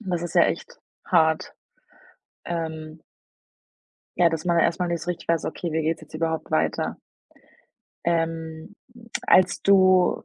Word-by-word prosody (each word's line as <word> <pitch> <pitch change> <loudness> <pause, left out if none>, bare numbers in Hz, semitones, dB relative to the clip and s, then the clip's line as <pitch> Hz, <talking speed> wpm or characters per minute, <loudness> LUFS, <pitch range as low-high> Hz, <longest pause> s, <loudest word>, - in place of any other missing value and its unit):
Das 180 -5 -3
ist 175 -1 -5
ja - - +6
echt - - -3 0.3
hart. 160 -3 +2 0.9
Ähm 160 -2 -5 1.2
ja, 175 -1 +5
dass 165 0 -4
man 170 -1 +3
erst 165 +2 +1
mal 180 - 0
nicht 170 -1 -2
so 175 - -5
richtig 175 - -10
weiß: 165 -2 +1
„Okay, 170 - -4
wie 160 +1 0
geht's 160 +1 -1
jetzt 155 - -16
überhaupt 160 0 -2
weiter?“ 80 0 0 1.1
Ähm, 165 +2 -2 0.5
als 185 +1 +4
du 185 -2 +4
165 Hz, 140 wpm, -24 LUFS, 160-175 Hz, 1.2 s, ja